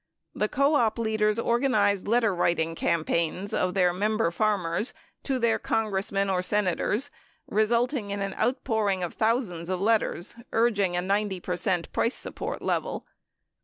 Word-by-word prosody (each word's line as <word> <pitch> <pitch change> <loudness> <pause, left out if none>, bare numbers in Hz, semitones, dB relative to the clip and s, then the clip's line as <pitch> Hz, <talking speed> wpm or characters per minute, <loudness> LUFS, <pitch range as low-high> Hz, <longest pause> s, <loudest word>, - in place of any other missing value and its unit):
The 210 - 0
co 280 +3 +2
op 230 -4 +1
leaders 215 -1 +1
organized 230 -5 +2
letterwriting 180 -8 +1
cam 165 0 0
paigns 170 +5 -1
of 185 +1 0
their 180 -2 +3
member 210 0 +1
farmers 205 +1 0 0.3
to 270 -2 -1
their 235 -2 +2
Congressmen 200 -2 0
and 185 -1 0
Senators 210 +7 0 0.3
resulting 235 +2 +1
in 200 0 -3
an 195 -1 -2
outpouring 220 -5 0
of 175 - -3
thousands 220 -7 0
of 185 -1 -1
letters 210 -3 0 0.2
urging 205 -6 +2
a 175 - 0
90 200 0 0
percent 180 -1 -1
price 230 - +1
support - - -5
level. - - -2
205 Hz, 140 wpm, -27 LUFS, 185-225 Hz, 0.3 s, their